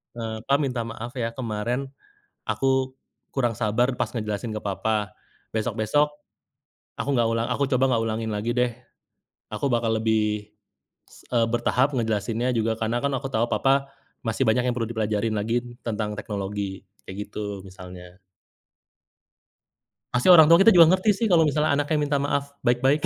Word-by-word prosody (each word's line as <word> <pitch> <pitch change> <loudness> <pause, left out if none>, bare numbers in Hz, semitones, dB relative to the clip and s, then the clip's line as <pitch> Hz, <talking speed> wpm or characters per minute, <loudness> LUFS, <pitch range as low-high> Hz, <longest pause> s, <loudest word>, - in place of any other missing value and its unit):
Eee, 110 -2 -5
"Pa, 140 - +4
minta 125 -4 -1
maaf 115 +1 -7
ya, 115 -2 -2
kemaren 120 +3 -3 0.6
aku 130 -1 0 0.3
kurang 120 -4 0
sabar 120 +5 +1
pas - - -2
ngejelasin 105 -1 -4
ke - - -3
Papa, 105 0 -1 0.4
besok-besok 110 +6 +1 0.9
aku 115 +5 -2
nggak 120 -1 +3
ulang 115 +1 0
aku 140 - 0
coba 130 0 +3
nggak 115 -3 +1
ulangin 110 0 -2
lagi 105 +3 -2
deh, 125 0 +1 0.8
aku 140 - -2
bakal 115 -1 +1
lebih, 105 -1 0 0.6
s - - -18
eee, 115 -1 +4
bertahap 120 +3 +1
ngejelasinnya 115 +2 -1
juga. 110 -1 0
Karena 115 +2 -1
kan 140 - +1
aku 135 +1 -5
tahu, 115 -3 0
Papa 135 0 +2 0.3
masih 115 +2 0
banyak 125 +3 +3
yang 120 - -2
perlu 115 -2 -1
dipelajarin 110 -1 -1
lagi 110 +3 0 0.2
tentang 105 -2 -3
teknologi," 100 -1 -5 0.2
kayak 100 +2 -7
gitu 105 -1 -5
misalnya. 90 -1 -12 1.9
Pasti 125 +5 +1
orang 160 -3 +9
tua 165 +1 +8
kita 225 - +7
juga 170 -4 +8
ngerti 190 +3 +2
sih, 220 +3 0
kalau 165 -2 +6
misalnya 150 -1 +2
anaknya 145 +2 0
minta 145 -1 +1
maaf 140 0 -2
baik-baik. 130 +4 +2
115 Hz, 155 wpm, -24 LUFS, 110-135 Hz, 1.9 s, orang